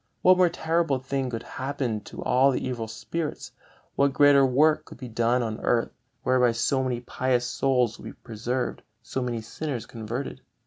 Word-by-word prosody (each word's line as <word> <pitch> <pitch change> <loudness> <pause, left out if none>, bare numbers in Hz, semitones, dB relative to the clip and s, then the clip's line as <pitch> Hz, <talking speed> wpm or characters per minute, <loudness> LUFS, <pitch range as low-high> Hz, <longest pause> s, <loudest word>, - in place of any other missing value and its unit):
What 185 0 +7
more 180 -1 +5
terrible 165 -4 0
thing 135 0 -2
could 115 -2 -4
happen 130 -4 -3
to - - -8
all 130 +2 +4
the 130 - -1
evil 120 -3 -3
spirits? 160 +7 -5 0.4
What 140 -1 +3
greater 145 -1 +6
work 150 +4 +3
could - - -12
be 130 - -7
done 120 +2 +1
on 110 -1 -3
earth, 115 -1 +1 0.3
whereby 125 -2 +3
so 130 +4 +1
many 125 -2 -2
pious 125 0 0
souls 125 -2 +1
would - - -11
be - - -7
preserved, 120 +3 -3 0.2
so 130 - -3
many 120 -2 -2
sinners 120 0 -5
converted? 115 +4 -5
130 Hz, 175 wpm, -26 LUFS, 120-140 Hz, 0.4 s, What